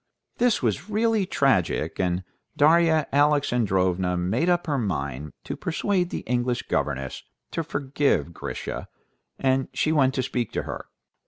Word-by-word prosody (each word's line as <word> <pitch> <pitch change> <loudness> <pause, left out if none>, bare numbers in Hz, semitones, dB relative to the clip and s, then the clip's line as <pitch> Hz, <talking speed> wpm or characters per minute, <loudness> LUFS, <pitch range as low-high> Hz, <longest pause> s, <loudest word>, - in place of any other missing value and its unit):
This 240 - +2
was 140 - -1
really 215 -2 +1
too - - -6
tragic, 130 -11 +2
and 90 0 0 0.3
Darya 160 0 +4
Alexandrovna 95 -11 +2
made 110 - +1
up 175 -1 +2
her 145 -4 0
mind 70 - -3
to - - -4
persuade 180 +1 0
the - - -4
English 125 0 -1
governess 65 0 -2 0.3
to 165 - -2
forgive 140 - 0
Grisha, - - -5 0.5
and 130 0 +1
she 155 - +1
went 135 -4 +3
to 130 - 0
speak 120 -3 -2
to - - -1
her. - - -6
130 Hz, 145 wpm, -25 LUFS, -, 0.5 s, Darya